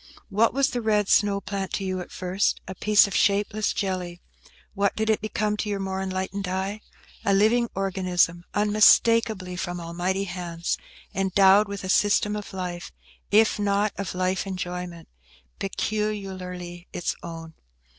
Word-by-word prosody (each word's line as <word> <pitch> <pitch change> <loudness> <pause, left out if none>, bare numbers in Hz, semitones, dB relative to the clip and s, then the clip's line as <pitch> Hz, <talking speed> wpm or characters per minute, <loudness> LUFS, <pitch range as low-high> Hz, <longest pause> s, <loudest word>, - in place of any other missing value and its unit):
What 220 +3 +3
was 275 +2 +1
the 245 - -2
red 210 -2 +1
snow 200 -1 +3
plant 195 0 -4
to 200 - -1
you 185 -1 -2
at - - -9
first? 185 +2 0
A 190 - -5
piece 210 +2 +5
of 200 - -4
shapeless 205 +1 +2
jelly. 180 -3 -3 0.5
What 200 -1 0
did 220 0 +1
it 215 - 0
become 215 -1 -1
to 210 - -2
your 200 -1 -1
more 190 0 -3
enlightened 190 +1 -3
eye? 190 +3 -3 0.4
A 200 - +3
living 230 +4 +3
organism, 180 -3 +1
unmistakably 210 -2 +4
from 175 0 -4
Almighty 175 +3 -2
hands, 175 -2 -3 0.3
endowed 195 +2 +4
with 200 0 -6
a 185 - -5
system 205 +1 +3
of 210 -1 -6
life, 180 -2 -5 0.4
if 215 0 +4
not 205 0 +1
of 200 -2 -4
life 185 +1 0
enjoyment, 180 -2 -5 0.5
peculiarly 190 -4 -4
its 175 - -2
own. 165 -1 -8
195 Hz, 150 wpm, -25 LUFS, 180-210 Hz, 0.5 s, piece